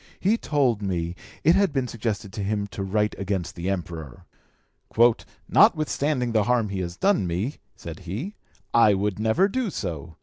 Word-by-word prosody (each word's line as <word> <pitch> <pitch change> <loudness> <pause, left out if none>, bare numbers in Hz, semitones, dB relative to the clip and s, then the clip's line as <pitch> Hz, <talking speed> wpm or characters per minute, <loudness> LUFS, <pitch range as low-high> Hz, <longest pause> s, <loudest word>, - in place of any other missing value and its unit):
He 205 +4 +3
told 135 - +1
me 85 -4 -2 0.3
it 165 - +6
had 195 -3 +3
been 135 -3 -1
suggested 105 -4 -4
to 105 - -4
him 100 0 -1
to 100 - -5
write 105 +2 0
against 95 -3 -2
the 90 +2 -4
Emperor. 85 -8 -5 1.2
'Notwithstanding 145 -4 +3
the 110 -3 +2
harm 120 -3 +2
he 100 -1 -3
has 85 0 -4
done 195 - +2
me,' 95 - -2 0.2
said 80 -2 -8
he, 105 - -5 0.4
'I 110 -3 +6
would 100 0 -1
never 110 - +3
do 245 +2 -1
so. 85 - -5
105 Hz, 165 wpm, -25 LUFS, 90-130 Hz, 1.2 s, it